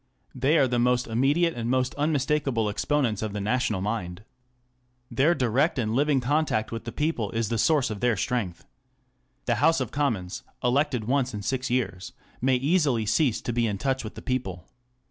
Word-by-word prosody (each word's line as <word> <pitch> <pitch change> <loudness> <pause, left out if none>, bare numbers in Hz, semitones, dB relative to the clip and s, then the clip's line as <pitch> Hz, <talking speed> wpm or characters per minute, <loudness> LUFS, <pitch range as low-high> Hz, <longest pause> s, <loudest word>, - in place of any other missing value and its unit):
They 135 +5 +2
are 135 - +4
the 120 -1 0
most 125 0 +2
immediate 140 +9 +2
and 120 0 -3
most 130 0 +1
unmistakable 145 -6 0
exponents 120 -1 0
of 110 -2 -3
the 105 - -3
national 110 -1 0
mind. 100 -2 -3 0.9
Their 155 +6 +3
direct 130 +5 +1
and 110 -3 -1
living 140 +2 +2
contact 135 -4 0
with 115 0 -5
the 115 - -4
people 145 -7 -1
is 115 -2 -1
the 115 - -1
source 145 -3 +2
of 105 - -5
their 120 -1 +1
strength. 95 -7 -2 0.8
The 120 - +1
House 165 -1 +4
of 130 -4 -3
Commons, 110 -11 -1 0.2
elected 130 -1 +1
once 130 -1 0
in 105 - -5
six 130 +2 -2
years, 120 -7 -2 0.3
may 130 +1 +3
easily 140 -4 +1
cease 120 +2 +1
to 120 - -3
be 120 -1 +1
in 105 -2 -2
touch 130 +5 -1
with 110 - -8
the - - -9
people. 95 -10 -3
125 Hz, 185 wpm, -26 LUFS, 110-140 Hz, 0.9 s, are